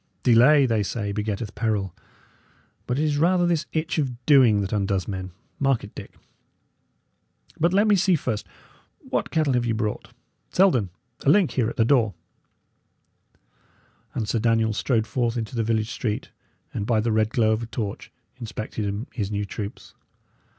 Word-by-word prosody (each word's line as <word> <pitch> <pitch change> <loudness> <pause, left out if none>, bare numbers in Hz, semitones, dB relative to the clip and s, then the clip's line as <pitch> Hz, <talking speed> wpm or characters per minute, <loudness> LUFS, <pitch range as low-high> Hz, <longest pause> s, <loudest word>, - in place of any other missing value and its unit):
Delay, 130 +5 +6
they 115 -4 +1
say, 100 +2 -3
begetteth 105 +1 -3
peril; 105 -5 -1 0.9
but 125 - -1
it 150 - +1
is 145 -1 0
rather 175 +2 +3
this 170 -2 0
itch 160 0 -1
of 125 -4 -3
doing 125 -8 +5
that 95 +2 -3
undoes 100 -2 0
men; 95 -2 -4 0.3
mark 135 -3 +1
it, 100 - -10
Dick. - - -10 1.4
But 170 +2 +3
let 200 +3 +3
me 210 - +5
see, 185 -1 +3
first, 115 -8 -3 0.5
what - - -3
cattle 155 -5 +1
ye 120 -1 0
have 115 -1 0
brought. 105 -2 -3 0.4
Selden, 150 - +3 0.3
a - - +3
link 185 +1 +4
here 120 -4 0
at - - -7
the 115 - +3
door!" 115 -6 +2 2.0
And 110 - -2
Sir 115 - 0
Daniel 115 -1 +2
strode 110 0 0
forth 120 -2 -1
into 115 +1 -4
the 115 - 0
village 110 0 0
street, 105 -3 -3 0.4
and, 100 - -3
by 115 -3 +2
the 115 +2 0
red 110 0 +2
glow 115 -3 +2
of 110 +1 0
a 115 - -5
torch, 105 -3 -5 0.3
inspected 110 -2 -4
his 100 -5 -2
new 105 -1 -2
troops. 100 +2 -7
115 Hz, 165 wpm, -24 LUFS, 105-135 Hz, 2.0 s, Delay